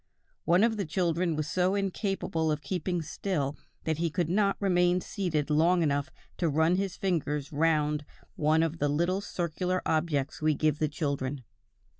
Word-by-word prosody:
One 175 Hz, +4 st, +4 dB
of 225 Hz, -1 st, +2 dB
the 200 Hz, -, -1 dB
children 170 Hz, 0 st, 0 dB
was 155 Hz, 0 st, -2 dB
so 185 Hz, +3 st, +1 dB
incapable 195 Hz, -5 st, -1 dB
of 150 Hz, -1 st, -2 dB
keeping 175 Hz, -2 st, -2 dB
still 155 Hz, -3 st, -2 dB, 0.3 s
that 160 Hz, -1 st, -1 dB
he 170 Hz, 0 st, +1 dB
could 170 Hz, 0 st, -1 dB
not 200 Hz, +2 st, +2 dB
remain 180 Hz, -2 st, +3 dB
seated 165 Hz, -6 st, -2 dB
long 170 Hz, +3 st, +4 dB
enough 140 Hz, -2 st, 0 dB, 0.3 s
to 170 Hz, -, +1 dB
run 160 Hz, +4 st, +3 dB
his 195 Hz, -1 st, -2 dB
fingers 150 Hz, -6 st, -1 dB
round 150 Hz, -1 st, +1 dB, 0.3 s
one 155 Hz, +2 st, +3 dB
of 165 Hz, 0 st, -2 dB
the 145 Hz, -, +1 dB
little 175 Hz, +6 st, +1 dB
circular 180 Hz, 0 st, -2 dB
objects 155 Hz, -3 st, 0 dB
we 155 Hz, -1 st, +2 dB
give 155 Hz, 0 st, +1 dB
the 155 Hz, -, +1 dB
children. 140 Hz, -3 st, -3 dB
165 Hz, 165 wpm, -29 LUFS, 150-180 Hz, 0.3 s, One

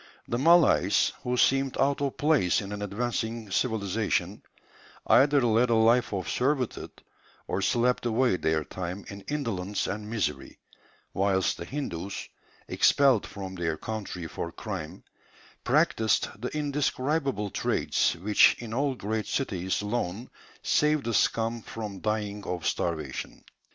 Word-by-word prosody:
The 120 Hz, -, -1 dB
Malays, 145 Hz, -, +4 dB
who 125 Hz, 0 st, -1 dB
seemed 135 Hz, +1 st, +2 dB
out 140 Hz, +1 st, +1 dB
of 140 Hz, -2 st, -2 dB
place 150 Hz, -, +3 dB
in 100 Hz, -1 st, -6 dB
an 105 Hz, 0 st, -5 dB
advancing 110 Hz, +1 st, -3 dB
civilization, 100 Hz, -3 st, -1 dB, 0.6 s
either 140 Hz, +2 st, +5 dB
led 120 Hz, +1 st, +3 dB
a 115 Hz, -, +3 dB
life 115 Hz, +2 st, +4 dB
of 95 Hz, -5 st, -3 dB
servitude, 130 Hz, -1 st, -2 dB, 0.4 s
or -, -, -1 dB
slept 120 Hz, 0 st, +1 dB
away 120 Hz, -3 st, +2 dB
their 80 Hz, -2 st, 0 dB
time 90 Hz, +4 st, -6 dB
in 100 Hz, 0 st, -8 dB
indolence 105 Hz, -10 st, -2 dB
and 105 Hz, +2 st, -4 dB
misery 75 Hz, -12 st, -3 dB, 0.6 s
whilst 95 Hz, -1 st, +1 dB
the 85 Hz, -, -6 dB
Hindus, 100 Hz, -, -5 dB, 0.4 s
expelled 135 Hz, -6 st, +3 dB
from 95 Hz, -2 st, -7 dB
their 85 Hz, -3 st, -2 dB
country 105 Hz, -5 st, -5 dB
for 85 Hz, +1 st, -5 dB
crime, 95 Hz, -8 st, -6 dB, 0.6 s
practised 110 Hz, -1 st, +2 dB
the 125 Hz, -, -2 dB
indescribable 140 Hz, -5 st, -1 dB
trades -, -, +1 dB
which 100 Hz, +5 st, +4 dB
in 115 Hz, -2 st, -7 dB
all 135 Hz, +2 st, 0 dB
great 110 Hz, -1 st, -3 dB
cities 95 Hz, -7 st, -1 dB
alone 105 Hz, +1 st, -3 dB, 0.3 s
save 150 Hz, -1 st, +2 dB
the 115 Hz, -, -2 dB
scum 115 Hz, +1 st, +1 dB
from 105 Hz, -3 st, -7 dB
dying 105 Hz, -1 st, -2 dB
of 90 Hz, -2 st, -4 dB
starvation. 80 Hz, -6 st, -3 dB
110 Hz, 130 wpm, -27 LUFS, 95-125 Hz, 0.6 s, either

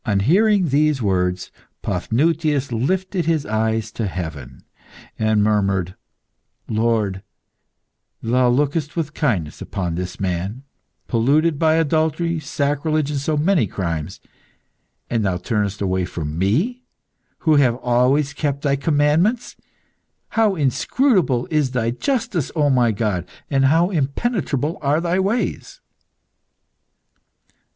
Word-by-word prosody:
On 100 Hz, -3 st, +1 dB
hearing 190 Hz, -, +3 dB
these 150 Hz, +1 st, +2 dB
words, 90 Hz, -4 st, -1 dB, 0.3 s
Paphnutius 150 Hz, +1 st, 0 dB
lifted 180 Hz, -, -1 dB
his 160 Hz, -3 st, +1 dB
eyes 110 Hz, 0 st, -1 dB
to 110 Hz, -1 st, -3 dB
heaven 75 Hz, -8 st, -6 dB, 0.6 s
and 110 Hz, -1 st, +2 dB
murmured 100 Hz, -4 st, +1 dB, 0.7 s
"Lord, 110 Hz, -4 st, 0 dB, 1.0 s
Thou 125 Hz, +2 st, +2 dB
lookest 145 Hz, +4 st, 0 dB
with 155 Hz, -3 st, -2 dB
kindness 95 Hz, -, -1 dB
upon 90 Hz, -3 st, -3 dB
this 90 Hz, +2 st, -5 dB
man 95 Hz, +6 st, -3 dB, 0.4 s
polluted 145 Hz, +6 st, +2 dB
by 160 Hz, -1 st, +3 dB
adultery, 160 Hz, +1 st, +1 dB
sacrilege, 145 Hz, +1 st, -1 dB
and 145 Hz, -, -1 dB
so 150 Hz, +2 st, -1 dB
many 160 Hz, -, +2 dB
crimes, 85 Hz, -2 st, -4 dB, 0.9 s
and 115 Hz, -2 st, -1 dB
Thou 95 Hz, -3 st, 0 dB
turnest 105 Hz, +2 st, -2 dB
away 95 Hz, -2 st, 0 dB
from 80 Hz, -4 st, -5 dB
me, 150 Hz, -, 0 dB, 0.6 s
who 155 Hz, -3 st, +4 dB
have 125 Hz, -4 st, +4 dB
always 130 Hz, +4 st, +1 dB
kept 140 Hz, -2 st, -2 dB
Thy 140 Hz, -2 st, +2 dB
commandments! 155 Hz, -, +1 dB, 0.7 s
How 220 Hz, -3 st, +2 dB
inscrutable 155 Hz, -, +1 dB
is 150 Hz, -4 st, +2 dB
Thy 120 Hz, -3 st, -1 dB
justice, 225 Hz, -, -2 dB
O 145 Hz, -3 st, +2 dB
my 120 Hz, -3 st, +3 dB
God! 100 Hz, -5 st, -2 dB, 0.2 s
and 135 Hz, -1 st, +3 dB
how 165 Hz, +7 st, +3 dB
impenetrable 155 Hz, -, -1 dB
are 145 Hz, +1 st, +2 dB
Thy 175 Hz, +2 st, 0 dB
ways!" 200 Hz, +6 st, -2 dB
135 Hz, 115 wpm, -21 LUFS, 105-160 Hz, 1.0 s, who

